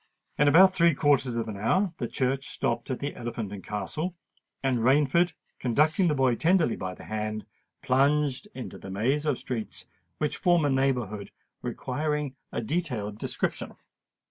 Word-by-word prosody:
In 145 - +5
about 185 +6 +7
three 170 -4 +4
quarters 135 -4 +2
of 115 -1 -2
an 105 -2 -5
hour 175 - +1
the 120 - -1
coach 135 +3 -1
stopped - - -2
at 130 - -1
the 145 +1 -3
Elephant 115 -4 -5
and 100 -3 -8
Castle; 155 - -3 0.5
and 130 -3 +2
Rainford, 145 +8 +3 0.3
conducting 155 - +2
the 150 - +2
boy 130 -2 +3
tenderly 165 0 +3
by 90 -1 -5
the - - -12
hand, 110 -1 -3 0.4
plunged 140 +5 +2
into 115 -8 -7
the 95 - -9
maze 130 +10 0
of 145 -4 +2
streets 115 -4 -5 0.3
which 150 - -1
form 175 -3 +3
a 145 - +2
neighbourhood 125 -7 0 0.3
requiring 150 -2 -2 0.2
a - - -2
detailed 120 -7 -2
description. - - -3
135 Hz, 160 wpm, -27 LUFS, 115-150 Hz, 0.5 s, about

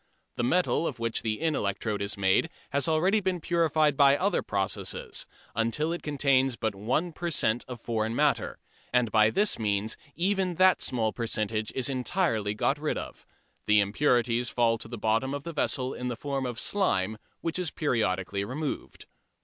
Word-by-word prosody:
The - - -2
metal 170 +4 +2
of - - -4
which 115 -1 -1
the 110 -2 -2
in 160 -1 +1
electrode 105 -2 -2
is 100 +1 -2
made 95 - +2 0.2
has 140 -1 +2
already 175 +7 +3
been 185 -3 -1
purified 155 -3 +2
by 140 0 +6
other 200 +5 +1
processes, 95 -1 -3 0.3
until 115 +8 0
it 175 - -5
contains 135 -3 +2
but 110 -2 -2
one 125 - -1
per 175 +2 -3
cent. 120 -6 +1
of 125 -2 -7
foreign 110 0 -2
matter, - - +1 0.3
and 125 -3 +2
by 110 -1 +5
this 205 - +1
means 105 0 0 0.2
even 185 0 0
that 185 +2 +4
small 110 -4 0
percentage 110 -2 -2
is 130 - +1
entirely 125 - 0
got 140 +7 +1
rid 155 0 -1
of. - - -8 0.4
The 105 0 +5
impurities 120 +2 +2
fall 115 -2 +2
to 110 - -7
the 120 +1 -6
bottom 115 +6 0
of 145 - -6
the 170 - -6
vessel 130 -3 0
in 125 - -5
the 120 - -2
form 135 +1 -3
of 120 -1 -4
"slime," 110 - 0 0.2
which 165 +1 -1
is 180 -3 -1
periodically 100 - -1
removed. 140 +7 -5
125 Hz, 175 wpm, -28 LUFS, 110-155 Hz, 0.4 s, by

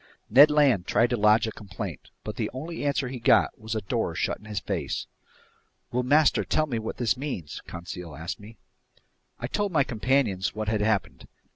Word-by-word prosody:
Ned 140 +6 +9
Land 140 -11 +3
tried 115 0 +3
to - - +3
lodge 105 0 +4
a 110 - -3
complaint, 95 -6 -7
but - - -5
the - - -2
only 165 +5 -5
answer 140 -2 0
he 130 -1 -6
got 115 - +3
was 110 +1 -4
a 110 - -1
door 95 - -2
shut - - -1
in - - -17
his 105 -2 -3
face. - - -3 0.9
"Will 125 - +1
master 145 +4 +4
tell 155 - +1
me 120 -6 -2
what 110 - -5
this 115 -6 +1
means?" 125 - -5
Conseil 85 -1 -7
asked 80 0 -5
me. 105 +2 -13 0.8
I 120 - -5
told 205 +10 -1
my 155 -5 +4
companions 115 -6 0
what 110 -1 -2
had 110 -1 0
happened. 100 -12 -1
110 Hz, 190 wpm, -26 LUFS, 100-135 Hz, 0.9 s, Ned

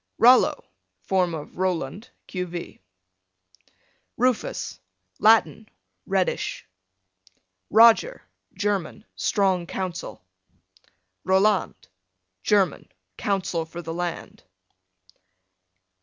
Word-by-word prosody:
Rollo, 250 +2 +5 0.4
form 180 -3 +1
of 150 - -9
Roland, 185 - -2 0.2
q.v. 175 -2 -6 1.4
Rufus, 250 - -1 0.4
Latin, 220 0 +3 0.4
reddish. 190 -2 -1 1.0
Roger, 235 - +5 0.3
German, 200 +1 -2
strong 190 -5 +1
counsel. 185 - -5 1.0
Roland, 190 +1 +2 0.7
German, 195 - +1 0.2
counsel 185 - -1
for 165 +2 -9
the 165 0 -5
land. 175 0 -5
190 Hz, 65 wpm, -24 LUFS, 175-210 Hz, 1.4 s, Rollo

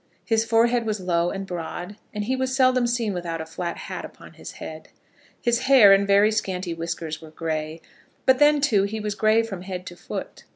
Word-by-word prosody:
His 225 -1 +2
forehead 230 +1 +2
was 215 -1 -1
low 175 -2 +1
and 195 +1 -5
broad, 175 +2 -6 0.2
and 210 -1 -3
he 255 +5 -1
was 260 0 -1
seldom 255 -2 +3
seen 235 -3 -1
without 170 -2 -4
a 160 - -4
flat 170 +2 -5
hat - - -6
upon - - -12
his - - -10
head. - - -9 0.5
His 240 +1 0
hair 225 -8 +8
and 195 0 +3
very 200 +2 +5
scanty 185 -4 -2
whiskers 165 -1 -5
were 160 - -11
gray; 155 0 -4 0.4
but, 260 -1 +4
then 295 0 +5
too, 225 -8 +3
he 220 +2 -4
was 210 -1 -3
gray 215 +2 +3
from 195 -5 -6
head 185 -1 -6
to 175 - -8
foot. - - -7
200 Hz, 205 wpm, -24 LUFS, 175-235 Hz, 0.5 s, hair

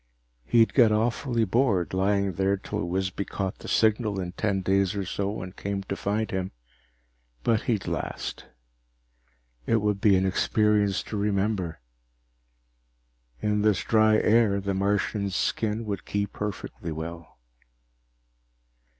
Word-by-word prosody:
He'd 115 - +4
get 120 -5 +6
awfully 115 +2 +1
bored, 100 -5 +1
lying 100 0 +1
here 95 +2 +1
till 105 0 -4
Wisby 95 +2 -2
caught 95 -1 -4
the - - -10
signal 110 -2 +2
in 90 -1 -4
ten 95 +1 -1
days 95 +1 +1
or 100 -1 -2
so 100 +2 -3
and 90 +1 -9
came 100 0 -3
to 100 - -4
find 105 +3 -2
him, 95 0 -3 0.9
but 115 -2 +2
he'd 110 -5 0
last. - - -4 1.2
It - - +3
would 105 -2 0
be 100 -3 +5
an 95 0 +2
experience 105 0 +2
to 105 - -5
remember. 100 - -1 1.6
In 105 0 +1
this 105 -2 +2
dry 110 -1 +4
air, 110 -2 +3
the 100 0 -2
Martian's 100 0 0
skin 110 +1 -1
would 100 -4 -4
keep 100 0 -2
perfectly 100 -5 -5
well. 80 -1 -7
100 Hz, 135 wpm, -26 LUFS, 95-110 Hz, 1.6 s, get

